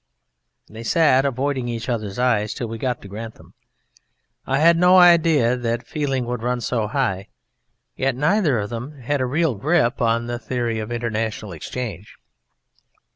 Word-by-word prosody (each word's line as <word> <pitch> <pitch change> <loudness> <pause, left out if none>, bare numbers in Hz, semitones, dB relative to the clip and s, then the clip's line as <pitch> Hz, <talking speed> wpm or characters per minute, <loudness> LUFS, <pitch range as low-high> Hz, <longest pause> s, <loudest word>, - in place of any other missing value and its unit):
They 110 +1 -10
sat 135 +1 +3
avoiding 135 -1 -1
each 115 0 -4
other's 110 -5 -3
eyes 110 -4 +1
till 120 - -4
we 115 0 -6
got 125 -1 -2
to - - -9
Grantham. 110 +3 -9 0.9
I 135 - +1
had 165 +3 +5
no 180 +2 +5
idea 165 -8 +5
that 120 -1 -3
feeling 135 -4 -2
could 120 -1 -4
run 125 +1 -1
so 115 -2 -1
high, 105 -6 -1 0.7
yet 135 -1 0
neither 150 - +2
of 105 0 -3
them 125 +6 -6
had 140 +3 -1
a 130 - 0
real 155 +2 +1
grip 140 - +1
on 115 0 +1
the 120 0 -4
Theory 120 -1 -2
of 110 +1 -5
International 110 -3 -3
Exchange. 100 +3 -6
120 Hz, 160 wpm, -22 LUFS, 115-140 Hz, 0.9 s, had